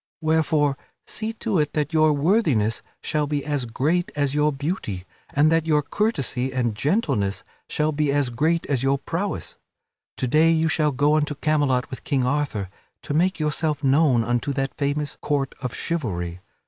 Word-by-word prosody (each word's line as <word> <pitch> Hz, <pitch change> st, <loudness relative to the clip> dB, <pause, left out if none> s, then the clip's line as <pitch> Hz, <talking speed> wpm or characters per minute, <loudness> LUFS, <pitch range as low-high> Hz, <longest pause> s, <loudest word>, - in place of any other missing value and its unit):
Wherefore, 155 Hz, -3 st, +1 dB, 0.3 s
see 220 Hz, 0 st, -2 dB
to 220 Hz, -5 st, -1 dB
it 150 Hz, -1 st, 0 dB
that 150 Hz, +1 st, -1 dB
your 155 Hz, -1 st, +5 dB
worthiness 145 Hz, -, +2 dB, 0.2 s
shall 150 Hz, -1 st, 0 dB
be 145 Hz, -1 st, -2 dB
as 145 Hz, -4 st, -1 dB
great 155 Hz, +10 st, 0 dB
as 145 Hz, -2 st, 0 dB
your 150 Hz, +1 st, +2 dB
beauty, 135 Hz, -, -4 dB, 0.3 s
and 150 Hz, +3 st, +3 dB
that 165 Hz, 0 st, +2 dB
your 150 Hz, -2 st, +3 dB
courtesy 140 Hz, -, -1 dB
and 125 Hz, -3 st, 0 dB
gentleness 135 Hz, -, 0 dB, 0.3 s
shall 150 Hz, +1 st, 0 dB
be 150 Hz, -1 st, 0 dB
as 140 Hz, -3 st, +1 dB
great 160 Hz, +7 st, +1 dB
as 135 Hz, -4 st, 0 dB
your 135 Hz, +1 st, +2 dB
prowess. 175 Hz, +8 st, -4 dB, 0.6 s
To 130 Hz, -, -1 dB
day 155 Hz, +6 st, +4 dB
you 160 Hz, 0 st, +3 dB
shall 155 Hz, -2 st, +2 dB
go 145 Hz, +3 st, +2 dB
unto 150 Hz, -1 st, -1 dB
Camelot 145 Hz, -3 st, +1 dB
with 130 Hz, -, -7 dB
King 135 Hz, -4 st, 0 dB
Arthur 125 Hz, -9 st, -1 dB, 0.3 s
to -, -, -3 dB
make 180 Hz, +4 st, +2 dB
yourself 150 Hz, 0 st, 0 dB
known 135 Hz, -3 st, +4 dB
unto 120 Hz, +4 st, -1 dB
that 135 Hz, 0 st, -2 dB
famous 145 Hz, +1 st, -2 dB
Court 140 Hz, -2 st, -1 dB
of 125 Hz, -3 st, -4 dB
Chivalry. 90 Hz, -, -3 dB
145 Hz, 170 wpm, -23 LUFS, 130-155 Hz, 0.6 s, your